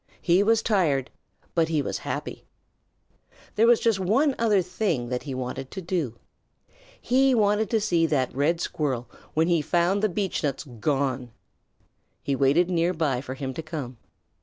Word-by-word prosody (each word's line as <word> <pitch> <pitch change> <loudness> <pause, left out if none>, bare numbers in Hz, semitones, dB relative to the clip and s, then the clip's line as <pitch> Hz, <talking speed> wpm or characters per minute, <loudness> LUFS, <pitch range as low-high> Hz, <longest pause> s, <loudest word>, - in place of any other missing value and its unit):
He 180 +2 +3
was 225 +2 +3
tired 155 - +1 0.4
but 165 -2 +2
he 160 -2 0
was - - -3
happy. - - -5 1.1
There 225 +2 +3
was 235 -1 +6
just 225 -4 +1
one 245 +11 +2
other 210 -5 +3
thing 175 - -2
that 125 0 -2
he 135 -3 -6
wanted 130 +1 -5
to 195 - -7
do. 165 -9 -2 0.8
He 265 +1 +3
wanted 210 0 +2
to 225 -2 +2
see 175 -6 +2
that 130 -6 0
Red 155 +5 +1
Squirrel 135 -8 -2 0.3
when 160 +1 +3
he 170 -3 +2
found 175 +6 +1
the 215 - +2
beechnuts 170 -7 -2 0.2
gone. 135 -2 -1 0.9
He 140 - 0
waited 140 +6 +3
near 175 0 +1
by 145 -6 0
for 130 -1 -6
him 135 -1 -4
to 160 - -5
come. 150 -6 -6
165 Hz, 160 wpm, -25 LUFS, 135-200 Hz, 1.1 s, was